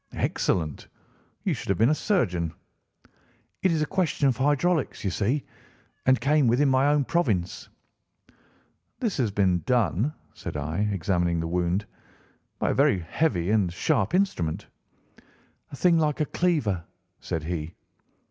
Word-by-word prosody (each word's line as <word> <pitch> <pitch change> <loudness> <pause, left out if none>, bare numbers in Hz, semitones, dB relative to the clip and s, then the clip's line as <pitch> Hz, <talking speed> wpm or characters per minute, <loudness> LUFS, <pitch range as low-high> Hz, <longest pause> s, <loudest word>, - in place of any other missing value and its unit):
"Excellent! 80 -6 -1 0.6
You - - +1
should - - -6
have 95 - +2
been 115 +6 +4
a - - +4
surgeon." 90 - 0 1.1
"It 190 - +3
is 160 -2 +1
a - - +1
question 175 -5 0
of 130 - +2
hydraulics, 145 +4 +1
you 95 - 0
see, 120 +10 0 0.6
and 130 -1 +5
came 145 -1 +3
within 130 +5 +3
my 130 +1 +3
own 145 -1 +3
province." 110 - -1 1.3
"This 230 -6 -1
has 125 -6 +1
been 95 -3 +1
done," 120 - +2 0.2
said - - -6
I, 80 +8 -1
examining 85 -2 0
the 80 - -2
wound, 90 +4 0 0.7
"by - - 0
a - - +1
very 100 - +3
heavy 90 - 0
and 100 -5 +2
sharp 110 - 0
instrument." 90 - 0 1.1
"A - - -6
thing 170 +3 +3
like 150 -2 0
a 155 - +2
cleaver," 140 - 0 0.4
said 80 - -4
he. 80 0 -4
115 Hz, 145 wpm, -26 LUFS, 90-150 Hz, 1.3 s, and